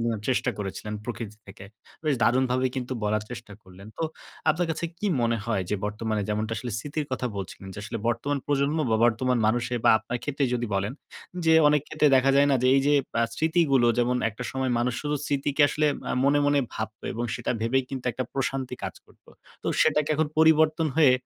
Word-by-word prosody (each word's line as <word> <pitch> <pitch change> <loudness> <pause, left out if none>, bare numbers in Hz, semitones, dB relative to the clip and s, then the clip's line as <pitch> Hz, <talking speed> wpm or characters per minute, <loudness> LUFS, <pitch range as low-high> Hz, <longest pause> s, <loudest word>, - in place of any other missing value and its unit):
নেয়ার 115 -3 -1
চেষ্টা 130 - +1
করেছিলেন, 100 +1 -5
প্রকৃতি 115 -3 -6
থেকে। 95 0 -11 0.4
বেশ 150 -2 +2
দারুণভাবে 130 +1 +2
কিন্তু 130 0 -3
বলার 105 0 +1
চেষ্টা 115 -3 -8
করলেন। 95 +2 -14
তো - - -2 0.5
আপনার 170 +2 0
কাছে 160 +1 -3
কি 210 - -2 0.2
মনে 115 0 +2
হয়? 115 -5 0
যে, - - +2
বর্তমানে 105 0 -2
যেমনটা 110 +1 -1
আসলে 120 0 -5
স্মৃতির 145 +2 -4
কথা 130 -1 -1
বলছিলেন 95 0 -7
যে, - - -8
আসলে 115 +2 -4
বর্তমান 140 +4 -1
প্রজন্ম 145 +2 +1
বা 110 - +3
বর্তমান 120 +2 +2
মানুষে 120 +2 0
বা - - +7
আপনার 125 - -4
ক্ষেত্রে 140 -1 -1
যদি 120 -1 -1
বলেন। 100 +4 -1 0.5
যে 160 0 +5
অনেক 150 0 +3
ক্ষেত্রে 155 -1 +2
দেখা 130 +1 +4
যায় 145 +1 +5
না? - - +4
যে, - - +3
এই - - +4
যে 145 - +4 0.3
আ - - +4
স্মৃতিগুলো। 160 -6 +2
যেমন 125 +1 +2
একটা 120 +4 -8
সময় 130 -1 -1
মানুষ 120 0 0
শুধু 150 0 -1
স্মৃতিকে 145 +1 +1
আসলে 150 +1 +1 0.2
আ - - 0
মনে, 145 +1 +4
মনে 145 0 +3 0.2
ভাবত 110 0 -5
এবং 120 +1 -3
সেটা - - -3
ভেবেই 130 +3 +1
কিন্তু 130 -2 -5
একটা 130 +3 -3
প্রশান্তি 135 -1 -2
কাজ - - -4
করত। - - -25 0.4
তো - - -7 0.2
সেটাকে 150 -1 +2
এখন 155 0 +1
পরিবর্তন 160 0 +4
হয়ে, 150 -5 +6
130 Hz, 200 wpm, -26 LUFS, 115-145 Hz, 0.5 s, বা